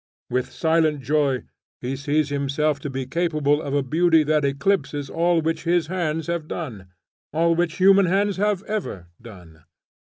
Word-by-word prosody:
With 125 0 -1
silent 160 -3 +1
joy 140 -1 +1 0.4
he 125 +2 -3
sees 145 +2 0
himself 145 +1 0
to 145 - -5
be 135 -1 -4
capable 150 -1 0
of 140 -2 -3
a 140 - +1
beauty 160 +3 +3
that 150 0 +1
eclipses 140 0 -1
all 170 0 +2
which 165 +1 -1
his 170 -1 +2
hands 165 -3 -1
have 170 -2 -3
done; 115 - -6 0.4
all 165 +2 +2
which 170 -1 0
human 195 0 +5
hands 200 +2 +1
have 205 -1 0
ever 190 - -5
done. 90 -9 -14
155 Hz, 160 wpm, -23 LUFS, 140-170 Hz, 0.4 s, human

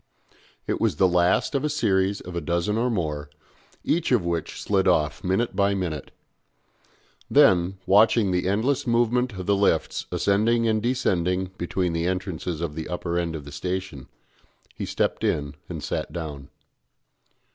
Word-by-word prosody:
It - - -2
was - - +2
the 95 +5 +4
last 90 +6 +2
of 140 -1 0
a 150 - +1
series 100 -9 +1
of 90 -1 -8
a 85 - -1
dozen 85 +6 0
or 120 +3 +1
more, 75 -9 -2 0.5
each 165 -3 0
of 115 -8 +3
which 85 -2 -3
slid 95 -2 +1
off 75 -6 +1
minute 95 +4 0
by 100 0 +2
minute. 85 -7 -3 1.2
Then, 90 0 +5
still - - -20
watching 105 0 +4
the 90 0 0
endless 125 +8 0
movement 120 +1 +2
of 95 -2 -6
the 100 - +3
lifts 100 -5 +1
ascending 115 +4 +2
and 110 -1 +1
descending 95 -7 0
between 85 0 -1
the 85 +1 -1
entrances 90 -3 -3
of 85 -3 -3
the 80 0 -5
upper 85 -1 -2
end 85 -1 -2
of 75 -3 -7
the 70 - -9
station, 90 -2 -4 0.7
he - - -5
stepped - - -1
in 70 -1 0 0.2
and - - -6
sat - - -3
down. 75 -4 -6
95 Hz, 165 wpm, -25 LUFS, 85-105 Hz, 1.2 s, Then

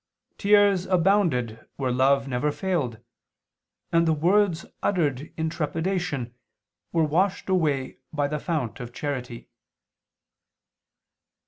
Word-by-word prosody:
Tears 200 -2 +4
abounded 170 - +1
where 130 -2 -1
love 135 +2 +3
never 135 +3 0
failed, 150 - -2 0.9
and 165 0 +3
the 160 - +4
words 175 +2 +2 0.2
uttered 150 -7 0
in 160 0 0
trepidation 165 -5 -2 0.6
were 165 - +2
washed 180 +6 0
away 150 -8 0
by 145 -2 0
the 150 +1 -3
fount 140 -9 -3
of 120 -2 -7
charity." 125 -5 -5
155 Hz, 105 wpm, -25 LUFS, 130-180 Hz, 0.9 s, Tears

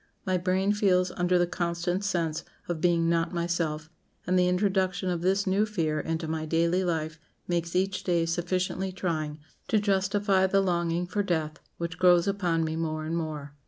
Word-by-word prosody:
My 185 -1 +1
brain 185 +3 +1
feels 185 -3 +2
under 180 0 +1
the 175 - +3
constant 175 +1 -2
sense 170 -5 -1 0.2
of 170 -3 -3
being 170 -2 +3
not 165 +1 +1
myself, 170 -2 -1 0.4
and 180 - 0
the 180 -1 +4
introduction 185 0 +1
of 170 -1 -2
this 195 +3 +2
new 195 +2 +2
fear 165 -8 -1
into 160 +1 -3
my 155 0 -3
daily 170 +3 +2
life 160 -3 -2 0.3
makes 170 -1 -1
each 190 +1 0
day 170 -2 +1
sufficiently 185 +3 -1
trying 155 -5 -3 0.3
to 220 - +2
justify 200 -1 +2
the 195 +1 +3
longing 175 -2 0
for 205 +4 -1
death, 160 -5 -2 0.2
which 170 -1 -5
grows 180 0 +5
upon 180 -5 +1
me 160 0 -2
more 155 -1 -2
and 165 +1 -2
more." 155 -4 -4
175 Hz, 175 wpm, -28 LUFS, 165-185 Hz, 0.4 s, grows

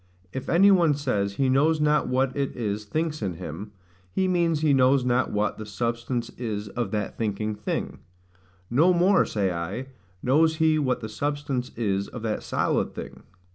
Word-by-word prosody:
If 130 - -5
any 195 +4 +6
one 170 -6 +4
says 105 -9 -1
he 135 +6 +1
knows 150 +5 +3
not 150 0 +2
what 130 +1 +1
it 140 -1 -2
is 105 -3 -3
thinks 155 +6 -2
in 95 -4 -2
him, 90 +4 -7 0.4
he 190 - +1
means 170 -4 +1
he 155 -2 +3
knows 130 0 +4
not 125 +1 +2
what 105 +1 -1
the 110 - -5
substance 115 +3 -2
is 105 -4 -3
of 120 0 -3
that 105 -1 -3
thinking 110 -1 -1
thing: 105 -1 -4 0.7
No 160 - +4
more, 185 +3 +4
say 100 -3 0
I, 95 +11 -4 0.3
knows 160 +5 +3
he 155 -1 +3
what 130 -4 0
the 110 - -4
substance 135 +2 -2
is 100 -4 -1
of 120 - -8
that 110 -2 -2
solid - - -1
thing. - - -8
125 Hz, 175 wpm, -25 LUFS, 105-150 Hz, 0.7 s, any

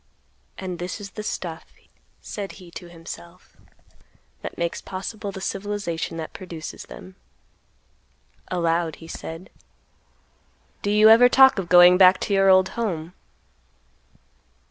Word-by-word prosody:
"And 185 -3 -6
this 180 +4 -5
is 200 -1 -9
the 215 - -7
stuff," 170 -6 -6 0.5
said 200 -2 -6
he 180 -3 -14
to 175 0 -10
himself, 170 +1 -12 0.9
"that - - -7
makes 170 0 -2
possible 200 +2 -6
the 190 -1 -8
civilization 195 -5 -4
that 160 -1 -6
produces 170 -4 -8
them." 185 0 -12 1.3
Aloud, 170 -2 0
he 165 - -13
said, 165 +2 -8 1.3
"Do 205 - -2
you 210 +1 +6
ever 240 +3 +8
talk 265 -4 +6
of 175 -3 -5
going 180 +1 +7
back 185 0 +7
to 205 - -2
your 195 0 +4
old 185 0 +5
home?" 180 -7 -4
185 Hz, 125 wpm, -23 LUFS, 170-200 Hz, 1.3 s, ever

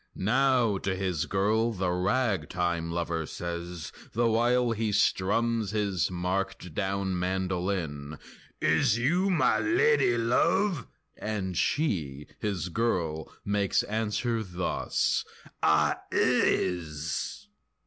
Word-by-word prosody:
Now 120 -1 +2
to 95 0 -1
his 90 -3 -1
girl 110 +4 +1
the 95 -3 -1
ragtime 90 - 0
lover 85 -2 -2
says, 85 -1 -5 0.2
The 120 +1 +2
while 120 +2 +2
he 110 -1 -1
strums 105 +2 +1
his 100 -5 0
marked 90 0 -3
down 95 0 -1
mandolin 90 -5 -2 0.4
"Is 110 - +3
you 175 +11 +2
ma 175 -5 +3
lady 345 - +3
love?" 150 - +2 0.3
and 100 -4 -3
she, 80 - 0
his 95 -5 -2
girl, 85 -7 -1
Makes 100 -1 +1
answer 110 +2 -1
thus: 90 -3 -1 0.4
"Ah - - +3
is!" 85 - 0
95 Hz, 100 wpm, -28 LUFS, 90-115 Hz, 0.4 s, Is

